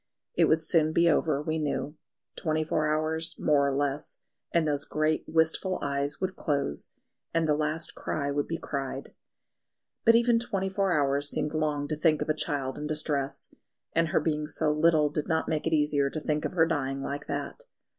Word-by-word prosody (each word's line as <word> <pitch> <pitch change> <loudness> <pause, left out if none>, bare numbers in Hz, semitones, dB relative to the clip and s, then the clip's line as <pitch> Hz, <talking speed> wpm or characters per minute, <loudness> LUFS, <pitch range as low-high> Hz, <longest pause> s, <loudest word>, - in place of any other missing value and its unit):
It - - +4
would 160 +1 +3
soon 155 -1 +2
be 170 +1 +4
over, 150 -2 +2
we 160 +1 -1
knew; 150 0 -2 0.4
twenty 155 -1 0
four 155 -1 0
hours, 160 +2 -1
more 145 -2 +3
or 140 - 0
less, 145 0 -2 0.3
and 165 -2 +2
those 145 -1 0
great 155 +1 0
wistful 160 +3 +1
eyes 140 0 -1
would 185 0 -2
close, 140 - -2 0.4
and 165 -1 +2
the 150 - +4
last 155 +2 -2
cry 140 -2 -2
would 145 0 -1
be 165 - -2
cried. 135 -3 -5 0.9
But 230 0 +6
even 235 0 +4
twenty 195 -5 -2
four 195 0 0
hours 140 +1 +1
seemed 150 - -2
long 150 -2 0
to 155 - -2
think 155 0 +2
of - - -9
a - - +4
child 140 -3 -2
in 150 - -3
distress, 145 -3 -2 0.4
and 165 0 +3
her 155 - +2
being 150 -2 -1
so 150 0 0
little 155 -1 +3
did 150 0 -2
not 160 -1 0
make 155 -1 -1
it 160 - +1
easier 150 -2 +2
to 155 - -4
think 150 0 -1
of - - -3
her 165 -3 +4
dying 135 -4 -2
like 145 +1 -4
that. - - -4
155 Hz, 195 wpm, -28 LUFS, 145-160 Hz, 0.9 s, But